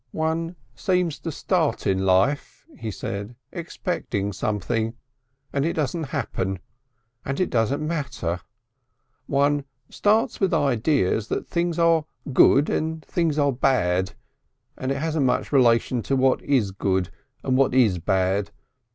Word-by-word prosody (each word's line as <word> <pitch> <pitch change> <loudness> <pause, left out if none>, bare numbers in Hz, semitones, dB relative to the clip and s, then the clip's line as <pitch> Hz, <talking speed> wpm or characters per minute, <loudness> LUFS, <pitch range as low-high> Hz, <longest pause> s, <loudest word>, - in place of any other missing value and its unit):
"One 165 +2 -1 0.2
seems 180 +3 0
to 165 - -4
start 165 0 0
in 95 0 +1
life," 95 +11 +1
he 115 - -5
said, 100 +3 -5 0.2
"expecting 160 - -3
something. 110 +4 -1 0.6
And 140 - +1
it 165 - 0
doesn't 160 +2 -1
happen. 115 -9 -2 0.7
And 135 +1 -3
it 185 - 0
doesn't 130 +6 +1
matter. 130 - -2 0.9
One 145 +1 +2 0.3
starts 215 +2 +2
with 195 -2 +2
ideas 120 - +1
that - - -2
things 170 -1 -1
are 165 -2 +3 0.3
good 140 +3 +6
and 160 0 -2
things 165 -4 0
are 145 -1 +3
bad 95 -7 +1 0.6
and 130 +1 -3
it 135 - 0
hasn't 155 -2 0
much - - 0
relation 120 -2 +3
to 135 - -1
what 130 0 +3
is 125 -9 +1
good 95 -2 -1 0.3
and 130 - +1
what 135 -1 +3
is 110 -9 +4
bad. 95 +3 +1
135 Hz, 135 wpm, -24 LUFS, 105-160 Hz, 0.9 s, good